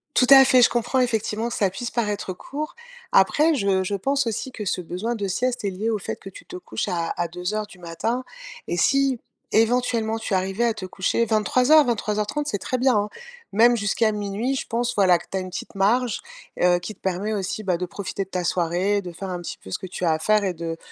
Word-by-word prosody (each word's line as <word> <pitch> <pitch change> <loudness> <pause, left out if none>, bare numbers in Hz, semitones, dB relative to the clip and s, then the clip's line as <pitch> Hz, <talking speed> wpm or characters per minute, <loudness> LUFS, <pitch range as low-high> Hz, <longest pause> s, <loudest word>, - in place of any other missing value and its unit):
Tout 250 - +4
à 270 -1 +11
fait, 260 -1 +5
je 240 - +6
comprends 240 +2 0
effectivement 225 -2 0
que - - -4
ça 195 - +2
puisse 225 +6 -5
paraître 210 -5 -2
court. 290 +10 -6 0.4
Après 295 +12 +4
je 195 -5 +1
je 200 +2 -2
pense 275 +6 0
aussi 230 +4 -3
que 215 -4 -6
ce 185 - -1
besoin 185 +8 -3
de 205 -3 -3
sieste 245 +6 -1
est - - +1
lié 200 +4 -2
au 220 -2 0
fait - - -4
que 195 - -10
tu 195 - -13
te - - -10
couches 175 - -4
à 170 -2 -1
à 175 - -1
02.00 180 +5 -3
du 190 - -16
matin. 200 +9 -2 0.4
Et - - -1
si 270 +5 +2 0.3
éventuellement 225 -1 +2
tu 220 - -4
arrivais 190 +5 0
à 230 - +2
te 195 - -6
coucher 190 +5 0
23:00-23:30, 235 +1 +2
c'est 205 - -1
très 255 - -2
bien, 255 -1 +3
hein. 205 0 0 0.4
Même 235 +3 +5
jusqu'à 215 +1 +1
00:00, 210 +5 -2
je - - -4
pense, 240 +1 -1
voilà 185 -3 +5
que - - -13
tu 195 - -1
as - - 0
une 185 0 -5
petite 180 - -7
marge, 220 +5 +1 0.4
heu, 180 0 +5
qui 175 +5 -7
te - - -28
permet 190 +3 -2
aussi, 205 +1 -3
bah, 185 -4 +1
de 180 - -2
profiter 195 +2 -4
de - - -30
ta 180 -2 -2
soirée, 180 +4 +1
de 180 -2 -7
faire 190 +3 -7
un 180 -1 -3
petit 175 - -6
peu 95 - -13
ce - - -2
que 185 - -7
tu 180 0 -4
as 165 - +3
à 160 - 0
faire 215 +5 +3
et 190 -2 0
de 165 -1 -5
205 Hz, 240 wpm, -23 LUFS, 185-235 Hz, 0.4 s, à